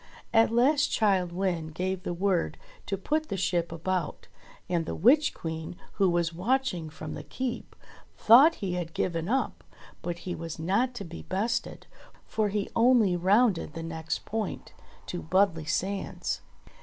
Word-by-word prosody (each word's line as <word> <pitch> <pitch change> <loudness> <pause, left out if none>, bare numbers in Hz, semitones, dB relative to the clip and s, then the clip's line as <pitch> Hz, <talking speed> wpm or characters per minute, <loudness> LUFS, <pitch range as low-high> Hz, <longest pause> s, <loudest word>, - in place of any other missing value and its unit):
At 225 0 +5
last 270 +6 +3
Childe 190 -5 +2
Wynde 170 -4 -2
gave 185 +1 -2
the - - -4
word 185 -1 0 0.3
to 195 - -1
put 310 +11 -1
the 195 - -2
ship 175 -3 0
about, 170 0 -3 0.4
and 170 -3 -1
the - - -3
Witch 275 - +5
Queen, 160 +1 -6 0.2
who 195 -2 +4
was 170 -1 +1
watching 185 -3 0
from 155 0 -7
the - - -6
Keep, 255 -2 -5 0.4
thought 270 +9 +7
he 190 -4 -3
had 175 -2 -4
given 165 0 -1
up: 265 +3 -1 0.4
but 175 -1 -3
he 180 - -2
was 165 -2 -6
not 200 +10 0
to 200 - -5
be 165 0 -8
bested: 220 +5 -2 0.4
for 215 -2 0
he 205 0 -1
only 230 -6 +4
rounded 190 -1 +2
the 165 - -5
next 160 -1 -4
point 220 -1 -4 0.3
to 175 - -5
Budley 170 -2 +1
sands. 195 +3 -2
185 Hz, 155 wpm, -28 LUFS, 170-225 Hz, 0.4 s, thought